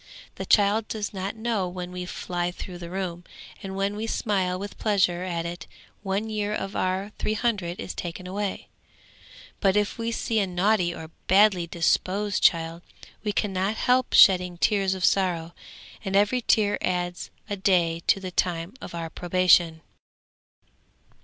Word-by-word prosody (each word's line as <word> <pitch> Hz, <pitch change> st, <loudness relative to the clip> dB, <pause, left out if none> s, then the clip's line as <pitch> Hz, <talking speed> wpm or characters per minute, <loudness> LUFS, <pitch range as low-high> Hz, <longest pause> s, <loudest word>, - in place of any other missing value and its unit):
The -, -, -7 dB
child 210 Hz, +1 st, +3 dB
does 210 Hz, -2 st, -4 dB
not 195 Hz, +2 st, -4 dB
know 220 Hz, -4 st, -1 dB
when 180 Hz, 0 st, -6 dB
we 180 Hz, 0 st, -5 dB
fly 175 Hz, -1 st, -3 dB
through 180 Hz, 0 st, -8 dB
the 170 Hz, -1 st, -7 dB
room, 180 Hz, -2 st, -4 dB, 0.4 s
and 190 Hz, -1 st, -6 dB
when 195 Hz, +1 st, -1 dB
we 220 Hz, +2 st, -4 dB
smile 190 Hz, -5 st, 0 dB
with 200 Hz, +2 st, -7 dB
pleasure 185 Hz, -5 st, +2 dB
at 170 Hz, -2 st, -3 dB
it 170 Hz, -1 st, -6 dB, 0.3 s
one 200 Hz, +2 st, -2 dB
year 210 Hz, -1 st, -2 dB
of 195 Hz, -1 st, -4 dB
our 190 Hz, +2 st, -1 dB
three 215 Hz, -, -1 dB
hundred 205 Hz, -7 st, -1 dB
is -, -, -5 dB
taken 175 Hz, +1 st, -6 dB
away. 195 Hz, +2 st, -4 dB, 0.9 s
But 195 Hz, 0 st, +3 dB
if 210 Hz, +2 st, 0 dB
we 230 Hz, 0 st, -1 dB
see 225 Hz, -1 st, 0 dB
a 200 Hz, -, +1 dB
naughty 180 Hz, 0 st, +2 dB
or 160 Hz, -2 st, -9 dB, 0.2 s
badly 190 Hz, -2 st, +4 dB
disposed 190 Hz, +5 st, 0 dB
child, 165 Hz, -1 st, +2 dB, 0.4 s
we 210 Hz, -, 0 dB
cannot 195 Hz, 0 st, -1 dB
help 250 Hz, +2 st, +2 dB
shedding 180 Hz, -2 st, +6 dB
tears 195 Hz, 0 st, +2 dB
of 185 Hz, -, 0 dB
sorrow, 175 Hz, -4 st, +1 dB, 0.5 s
and 195 Hz, -2 st, -2 dB
every 205 Hz, +5 st, +3 dB
tear 210 Hz, -3 st, +2 dB
adds 175 Hz, -1 st, -2 dB, 0.2 s
a 205 Hz, -, -2 dB
day 175 Hz, -4 st, +2 dB
to -, -, +4 dB
the 185 Hz, -1 st, -6 dB
time 175 Hz, 0 st, -1 dB
of -, -, -8 dB
our 165 Hz, -1 st, -5 dB
probation.' 175 Hz, -2 st, +3 dB
190 Hz, 160 wpm, -25 LUFS, 175-205 Hz, 0.9 s, shedding